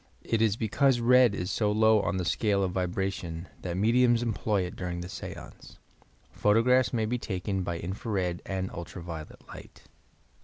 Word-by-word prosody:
It 115 -1 0
is 110 -2 +3
because 120 +4 +2
red 125 -2 +5
is 90 +2 -3
so 105 -2 +1
low 110 0 +4
in 95 - -1
the 90 - -2
scale 100 +3 +1
of 95 - -1
vibration 90 -2 -3
that 90 -1 -4
mediums 120 +3 +3
employ 110 -3 0
it 90 +4 -6
during 90 -2 -4
the 90 - -6
seance. - - -9 0.5
Photo 105 +2 +3
graphs 125 +1 +3
may 115 -3 0
be 120 +3 -1
taken 95 -2 -3
by 85 -2 -3
infra 95 +7 -5
red 90 -4 -1
and 95 -1 -3
ultra 85 +1 -8
violet 80 -3 -9
light. - - -12
100 Hz, 180 wpm, -28 LUFS, 90-115 Hz, 0.5 s, red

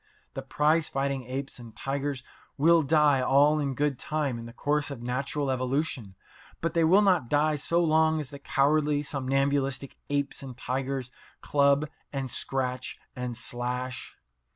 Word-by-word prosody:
The 135 - -4
prize 150 +4 +1
fighting 135 -1 -2
apes 135 +1 -5
and 115 -2 -12
tigers 140 -1 -3 0.3
will 165 +3 +5
die 150 -2 +4
all 145 +4 +4
in 140 -3 -1
good 145 -2 0
time 145 -6 -2
in 115 - -8
the - - -9
course 145 +4 0
of 130 -4 -7
natural 135 +3 -1
evolution, 130 -5 -2 0.4
but 165 -1 -2
they 165 -1 +3
will 190 +6 +5
not 180 - +2
die 150 +1 +2
so 170 +4 +1
long 160 0 +3
as 145 -2 -6
the 140 - -9
cowardly, 145 +1 +2
somnambulistic 135 -1 -1
apes 145 -1 -1
and 130 -3 -9
tigers 130 0 -3 0.3
club 140 +1 +3 0.2
and 135 -3 -3
scratch 130 -1 -2 0.2
and 125 -2 -4
slash. 125 +3 -4
140 Hz, 155 wpm, -28 LUFS, 130-150 Hz, 0.4 s, will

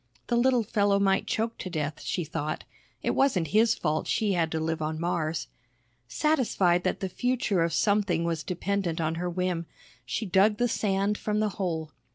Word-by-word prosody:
The 240 - +2
little 245 0 +3
fellow 205 -2 +2
might 195 -1 +2
choke 225 +1 -1
to 185 - -5
death, 155 -3 -3
she 180 - -2
thought, 155 0 -4 0.4
it - - +1
wasn't 190 - +2
his 225 +4 +4
fault 155 -1 -1
she 210 -3 +1
had 165 -3 +1
to 160 - -1
live 160 0 -2
on 155 +1 -2
Mars. 165 -2 -1 0.6
Satisfied 190 - +2
that - - -1
the 190 - -1
future 235 -2 0
of 165 0 +1
something 200 -2 +2
was 165 -2 -1
dependent 180 -1 -2
on 160 0 0
her 180 - -1
whim, 175 -2 -2 0.4
she 125 - -3
dug 200 +3 +3
the 245 - +2
sand 205 -2 0
from 210 0 -1
the 215 0 +2
hole. 165 -6 -3
185 Hz, 185 wpm, -27 LUFS, 165-210 Hz, 0.6 s, his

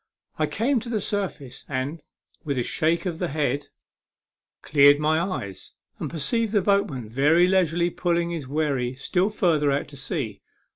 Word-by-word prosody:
I - - +2
came 255 +3 +1
to 235 - -8
the 225 -3 0
surface, 185 -11 -4
and, 140 +4 -3 0.4
with 140 -4 -2
a 125 - +1
shake 165 +8 0
of 175 -3 -3
the 180 - 0
head, 145 -2 -1 1.0
cleared 145 -1 +6
my 155 +2 +2
eyes, 105 - -4 0.3
and - - -3
perceived 215 - -1
the 205 - +4
boat 200 0 +3
man 125 -6 -6
very 145 +9 +4
leisurely 175 -2 +2
pulling 170 -1 0
his 160 -6 -5
wherry 135 -4 -1
still 180 +9 0
further 160 -8 +2
out 140 +1 -1
to 140 - -11
sea. 135 - -3
155 Hz, 165 wpm, -25 LUFS, 140-180 Hz, 1.0 s, cleared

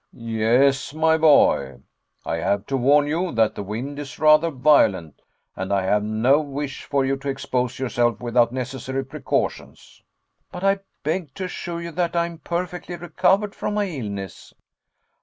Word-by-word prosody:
"Yes, 120 +5 +1
my 160 0 +3
boy. 140 - +4 0.5
I 80 - -2
have 100 +4 -1
to 135 - -2
warn 140 +3 +4
you 170 +4 -1
that 110 -1 +2
the - - -6
wind 120 +9 -5
is 145 -2 -8
rather 155 +1 +5
violent 125 - +2 0.3
and 95 +1 -4
I 100 -1 +1
have 105 +2 +2
no 110 +7 +3
wish 145 -1 -5
for 140 -2 0
you 135 +1 +1
to 140 +1 -5
expose 125 -2 -2
yourself 120 -2 0
without 120 0 +2
necessary 130 +1 -4
precautions." 135 - -4 0.5
"But 180 - -7
I 195 0 +3 0.2
beg 155 -1 -3
to 190 - -5
assure 175 -2 -5
you 170 - -6
that 175 +1 -2
I 170 0 +2
am 170 -1 -8
perfectly 175 +2 -4
recovered 190 +4 +1
from 210 - -3
my 210 -1 +1
illness." 105 - -7
135 Hz, 160 wpm, -23 LUFS, 120-165 Hz, 0.5 s, rather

